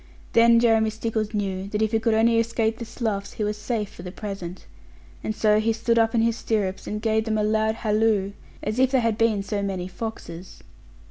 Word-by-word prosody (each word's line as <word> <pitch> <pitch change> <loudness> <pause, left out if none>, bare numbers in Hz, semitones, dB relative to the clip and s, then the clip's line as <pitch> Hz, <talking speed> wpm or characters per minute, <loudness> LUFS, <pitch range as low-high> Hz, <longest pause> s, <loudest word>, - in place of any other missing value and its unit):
Then 230 0 +6
Jeremy 225 -2 +3
Stickles 220 -1 -2
knew 195 -3 -2
that 210 +2 -1
if 220 - 0
he 225 - +2
could 225 0 +1
only 230 +1 +4
escape 230 -1 0
the 235 - -5
sloughs, 220 -3 -3
he 215 - -3
was 210 0 -1
safe 210 -1 -3
for - - -11
the 180 0 -7
present; 195 -3 -7 0.6
and 215 - -2
so 210 -1 +3
he 225 +1 +1
stood 230 +1 +1
up 225 +1 +2
in 225 - +3
his 230 -1 +2
stirrups, 200 -4 -2
and 210 - -3
gave 220 -1 +1
them 220 -1 0
a 210 - +1
loud 220 +1 +1
halloo, 215 -3 +1 0.3
as 215 +4 -2
if 260 0 +4
they 265 -1 +3
had 230 -2 +1
been 220 -3 +1
so 205 0 -2
many 190 -3 -3
foxes. 185 -4 -8
220 Hz, 215 wpm, -24 LUFS, 205-230 Hz, 0.6 s, Then